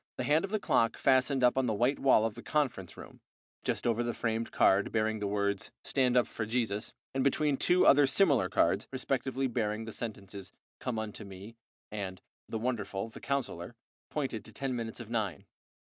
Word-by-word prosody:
The - - -2
hand 150 +5 +3
of 195 - -3
the 215 +1 0
clock 115 - +2
fastened 130 0 +3
up 125 +2 +4
on 130 - +1
the 110 - 0
white 125 +6 +1
wall 130 -5 +5
of 115 - -1
the 120 - -10
conference 125 - -1
room, - - -12 0.4
just - - -2
over 115 0 +2
the 120 0 -2
framed 115 0 -2
card 100 +1 +3
bearing 110 0 0
the 105 - -2
words 100 -1 -1
"Stand 125 -2 +2
up 125 - +5
for 110 - -5
Jesus," 110 -2 -1 0.2
and 135 0 0
between 145 +1 +2
two 180 +6 +3
other 145 0 +7
similar 145 - +3
cards, - - +2
respectively 135 0 -1
bearing 110 -3 -1
the 110 - -6
sentences 100 -5 -7 0.3
"Come 120 -3 -3
unto 110 -1 -5
Me," 100 +3 -10 0.4
and 95 -3 -5 0.3
"The 110 - -2
Wonderful, 110 -3 -2
the - - -11
Counsellor," 120 -8 -3 0.3
pointed 135 -7 -3
to 110 - -11
ten 130 +3 -3
minutes 115 -1 -5
of 115 -1 -9
nine. 105 -9 -2
115 Hz, 190 wpm, -31 LUFS, 105-130 Hz, 0.4 s, other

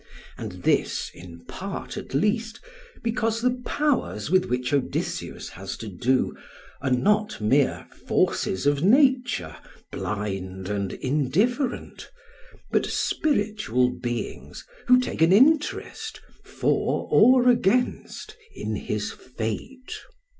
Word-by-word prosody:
And - - -8
this, - - +1
in 85 -1 -12
part - - -6
at - - -6
least, 220 +8 0 0.4
because 230 -1 0
the 250 +1 0
powers 260 - -1
with 185 -1 +4
which 125 +2 -2
Odysseus 140 -3 -2
has 95 +2 -7
to 110 - -7
do, 120 +7 0 0.5
are 135 - -1
not 210 +12 +2
mere 130 +6 +2 0.2
forces 95 - +1
of 145 0 +2
nature, 245 - +3 0.4
blind 95 -2 -4
and 100 -2 -2
indifferent, 200 - -1 0.6
but - - +2
spiritual 205 - +1
beings 120 -1 -5 0.2
who 250 0 +7
take 250 - -3
an 165 +2 +6
interest, 310 - +2 0.2
for - - 0
or 255 0 +6
against, 245 - +1 0.2
in 110 - -3
his 105 0 -3
fate. 125 - -6
160 Hz, 110 wpm, -25 LUFS, -, 0.6 s, who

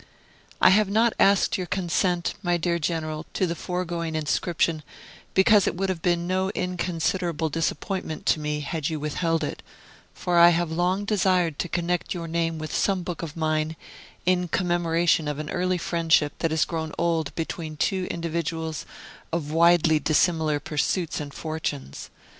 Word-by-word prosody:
I - - +7
have 205 +1 +4
not 225 +3 +3
asked 195 -1 +4
your 180 - -3
consent, 175 -1 0
my 175 -1 +1
dear 170 0 0
General, 155 -1 -3
to 185 - +1
the 170 - -1
foregoing 170 -2 -3
inscription, 155 +1 0 0.5
because 200 +1 +5
it - - 0
would 190 +2 -1
have 180 -3 -2
been 175 0 +1
no 185 +1 0
inconsiderable 175 -2 -1
disappointment 165 +1 -3
to - - +3
me 150 0 -2
had 150 +1 -2
you 160 -2 -3
withheld 160 +2 -1
it; 145 - -4 0.5
for 175 -1 +1
I 170 0 +9
have 170 -1 0
long 180 +4 0
desired 185 -6 +1
to 175 - -2
connect 175 +1 -1
your 170 -1 -5
name 165 0 -1
with 155 0 -6
some 190 -3 +1
book 175 -1 -5
of 165 -1 -6
mine, 155 0 0 0.5
in 180 0 +2
commemoration 170 -2 +1
of 150 -1 -2
an 155 0 -5
early 180 0 0
friendship 165 -4 +2
that 165 - +1
has 160 -1 +2
grown 160 -2 -4
old 165 -3 0
between 160 -1 -4
two 185 +3 0
individuals 165 -1 -3 0.4
of 160 -3 -2
widely 165 -1 +4
dissimilar 155 -1 +2
pursuits 155 +4 -1
and 145 -1 -6
fortunes. 155 - -5
170 Hz, 160 wpm, -25 LUFS, 155-180 Hz, 0.5 s, I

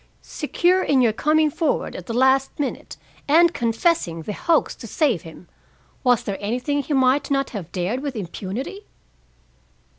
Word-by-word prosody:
Secure 365 +2 +1
in 275 -6 +2
your 230 -3 +3
coming 305 +5 +2
forward 315 0 -1
at 180 - -8
the 230 - -3
last 265 +3 +2
minute 285 - -4 0.3
and 335 +3 +5
confessing 230 - 0
the 210 - -4
hoax 335 +2 +1
to 230 - -10
save 255 - +1
him, 165 +2 -13 0.6
was 245 -3 +3
there 200 -1 -3
anything 250 +7 -1
he 285 +2 -4
might 260 +2 +2
not 275 -1 0
have 180 -7 -7
dared 190 +7 -2
with 275 -2 -5
impunity?" 215 - -6
265 Hz, 155 wpm, -22 LUFS, 210-300 Hz, 0.6 s, and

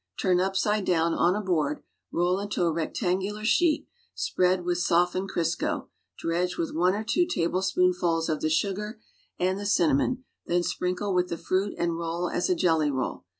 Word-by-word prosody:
Turn 180 -2 +3
upside 195 +3 +1
down 165 -2 +2
on 175 +2 +2
a 210 - -1
board, 155 -6 0 0.3
roll 180 +2 +1
into 200 -2 -2
a 170 - +2
rectangular 190 +6 -2
sheet, 320 +6 +2 0.3
s|)riaii 180 0 +1
^^ith 175 0 0
softened 180 +2 +1
Crisco, 170 -3 -1 0.3
dredge 175 +2 -1
with 165 - -2
one 180 +4 +2
or 215 - -3
two 350 +10 +1
tablespooiifuls 180 - +1
of 155 - -1
(lie 155 - +1
sugar 205 +6 -1 0.4
and 185 +2 0
the 205 - -5
cinnamon, 200 - +2 0.2
then 175 0 +2
s|iriuklc 180 +3 -2
with 180 0 +2
the 170 - -3
fruit 190 +4 -1
and 170 -1 -1
roll 170 +1 -2
as 175 - 0
a 180 - +3
jelly 160 -4 +2
roll. 130 -8 -3
180 Hz, 170 wpm, -27 LUFS, 170-195 Hz, 0.4 s, Turn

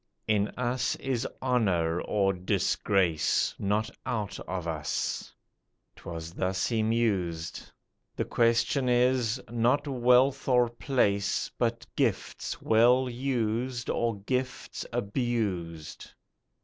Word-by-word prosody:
In 105 -1 +2
us 125 -1 0
is 130 -3 -2 0.2
honour, 90 -10 +1
or 100 -2 +1
disgrace, 90 -2 +1
Not 105 +2 0
out 105 -4 -3
of 90 -2 -3
us," 75 -5 -2 0.6
'twas 85 -1 -7
thus 95 0 -1
he 115 -2 0
mused, 100 -8 -1 0.4
"The - - -1
question 120 +3 +2
is, 125 -1 +2
not 120 +5 +2
wealth 130 +1 +3
or 125 -2 +4
place, 100 -5 0
But 115 -1 -1
gifts - - -1
well 125 +4 +4
used, 120 -1 -1
or 115 -3 -1
gifts 125 +4 -3
abused." 100 - -2
115 Hz, 100 wpm, -28 LUFS, 95-125 Hz, 0.6 s, or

